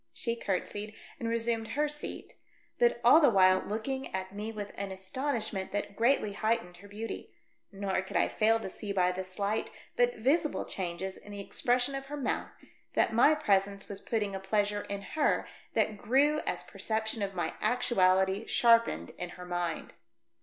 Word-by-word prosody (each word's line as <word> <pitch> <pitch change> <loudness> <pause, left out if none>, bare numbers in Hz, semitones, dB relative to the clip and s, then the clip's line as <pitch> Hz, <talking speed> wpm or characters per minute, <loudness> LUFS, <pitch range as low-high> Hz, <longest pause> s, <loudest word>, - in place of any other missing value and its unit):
She 230 - -2
curtsied 205 0 -3 0.2
and 230 - -2
resumed 230 -1 0
her 300 +2 +2
seat, 295 0 -5 0.5
but 480 -1 +3
all - - +8
the 290 - +7
while 185 -3 +5
looking 265 +7 -3
at 190 0 -4
me 210 +2 -4
with 205 -2 -6
an 200 -1 -5
astonishment 215 0 -3
that 205 0 -3
greatly 230 -3 +2
heightened 215 -4 -1
her 200 +3 -13
beauty; 215 +3 -6 0.4
nor 195 -1 -1
could 190 -1 -3
I - - +4
fail 225 +1 +3
to - - -4
see 205 +1 -5
by 180 -2 +3
the 185 +1 -4
slight, 200 +3 -1 0.3
but 245 0 +3
visible 300 +7 +1
changes 185 +1 -4
in 205 - -13
the 200 - -6
expression 245 +6 0
of 270 0 -5
her 295 +1 -5
mouth, 280 - -1 0.5
that - - +3
my 270 +7 +6
presence 200 -8 +1
was 200 -1 -6
putting 210 -4 -1
a 195 - -3
pleasure 205 +1 0
in 200 0 -3
her 310 +6 +1 0.3
that 210 -2 +1
grew 285 +8 +3
as - - -1
perception 220 0 -2
of 195 -1 -2
my 175 -2 -1
actuality 190 -4 +2
sharpened 230 -1 +3
in 180 - -3
her 180 - -8
mind. 175 -2 -3
210 Hz, 175 wpm, -30 LUFS, 190-235 Hz, 0.5 s, all